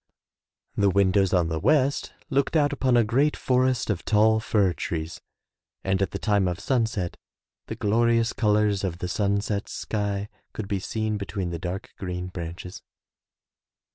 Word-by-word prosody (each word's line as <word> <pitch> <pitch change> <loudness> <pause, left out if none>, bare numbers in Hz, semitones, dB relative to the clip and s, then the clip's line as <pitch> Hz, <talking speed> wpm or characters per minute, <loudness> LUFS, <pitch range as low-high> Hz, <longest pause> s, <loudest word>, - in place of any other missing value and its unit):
The 100 -1 +3
windows 95 0 +3
on 90 -3 +2
the 80 -1 -2
west 140 - +2 0.2
looked 140 +3 +1
out 145 -1 +3
upon 130 -3 +2
a 120 - +5
great 135 +7 +2
forest 130 -1 +1
of - - -3
tall 110 +1 +4
fir 105 -4 +2
trees 80 -2 -4 0.6
and 95 0 0
at 95 - +1
the - - -4
time 100 -3 +1
of 90 0 -2
sunset 115 -6 -1 0.5
the - - -4
glorious 115 +2 +2
colors 105 -2 +2
of 90 -3 -2
the 90 - -4
sunset 100 +1 -1
sky 100 -1 -2 0.3
could 110 - -5
be 100 -1 -1
seen 110 +2 -2
between 95 -2 -3
the 85 - -4
dark 90 +3 -5
green 90 -1 -4
branches. 90 +1 -7
100 Hz, 155 wpm, -25 LUFS, 95-115 Hz, 0.6 s, a